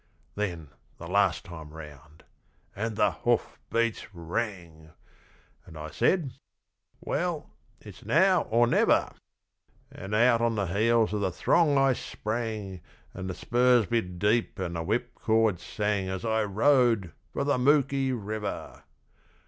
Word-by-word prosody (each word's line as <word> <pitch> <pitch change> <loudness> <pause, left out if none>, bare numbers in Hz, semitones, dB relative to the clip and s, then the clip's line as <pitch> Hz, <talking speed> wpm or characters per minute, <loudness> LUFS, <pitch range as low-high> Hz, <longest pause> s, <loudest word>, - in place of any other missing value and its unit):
Then 85 -8 -4 0.3
the 85 - -9
last 100 -1 +1
time 80 -4 -9
round! 75 -1 -13 0.5
And 110 +2 -3
the - - +3
hoofbeats 115 -1 -1
rang! 85 -3 -5 0.7
And 80 - -13
I 75 0 -7
said, 165 - +1 0.7
'Well, 170 -2 -3 0.3
it's - - -13
now 185 +2 +3
or 120 +2 +4
never!' 120 - +2 0.8
And 95 +3 -5
out 115 +1 +4
on 115 -1 +1
the 100 -2 0
heels 110 +5 +2
of 105 - -1
the 95 - +1
throng 145 - +2
I 135 -1 +4
sprang, 110 -6 -4 0.3
And 95 0 -6
the 95 - -4
spurs 125 -1 +3
bit 95 -5 -2
deep 105 +6 +1
and 90 -3 -4
the 85 - -2
whipcord 110 -1 0
sang 100 +1 -2
As 95 +3 -4
I 110 -1 +1
rode! 115 - +2 0.2
For - - -1
the 145 -2 +1
Mooki 135 0 +2
River! 110 -3 -5
110 Hz, 130 wpm, -27 LUFS, 90-120 Hz, 0.8 s, or